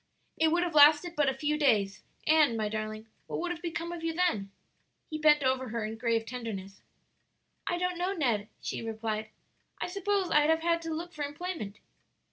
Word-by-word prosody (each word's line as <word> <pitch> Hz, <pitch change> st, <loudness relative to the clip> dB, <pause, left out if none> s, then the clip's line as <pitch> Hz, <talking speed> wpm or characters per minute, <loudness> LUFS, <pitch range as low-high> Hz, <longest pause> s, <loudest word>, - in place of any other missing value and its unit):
"It 320 Hz, -, +3 dB
would 340 Hz, +2 st, +2 dB
have 345 Hz, -2 st, -2 dB
lasted 300 Hz, +3 st, +6 dB
but 290 Hz, -2 st, +3 dB
a -, -, 0 dB
few 300 Hz, +2 st, -1 dB
days, 205 Hz, -9 st, +2 dB, 0.2 s
and, 305 Hz, -7 st, +4 dB
my 215 Hz, -1 st, -1 dB
darling, 215 Hz, 0 st, -4 dB, 0.2 s
what -, -, -3 dB
would 355 Hz, +1 st, -2 dB
have 345 Hz, -1 st, -5 dB
become 340 Hz, 0 st, -3 dB
of 345 Hz, -1 st, -6 dB
you 330 Hz, 0 st, -1 dB
then?" 320 Hz, -, 0 dB, 0.6 s
He 310 Hz, -, -3 dB
bent 300 Hz, -1 st, +5 dB
over 260 Hz, -1 st, +1 dB
her 225 Hz, -1 st, -2 dB
in 220 Hz, +1 st, -4 dB
grave 225 Hz, -1 st, 0 dB
tenderness. 215 Hz, -5 st, -6 dB, 0.9 s
"I 350 Hz, -, 0 dB
don't 360 Hz, 0 st, -1 dB
know, 360 Hz, +2 st, 0 dB
Ned," 240 Hz, -, 0 dB
she -, -, -4 dB
replied; 220 Hz, -1 st, -3 dB, 0.5 s
"I -, -, -1 dB
suppose 395 Hz, 0 st, -1 dB
I'd 300 Hz, +1 st, +4 dB
have 320 Hz, 0 st, +2 dB
had 335 Hz, 0 st, +2 dB
to 330 Hz, -, -5 dB
look 345 Hz, +2 st, -6 dB
for 300 Hz, -, -4 dB
employment." 290 Hz, -, -5 dB
295 Hz, 195 wpm, -30 LUFS, 225-340 Hz, 0.9 s, lasted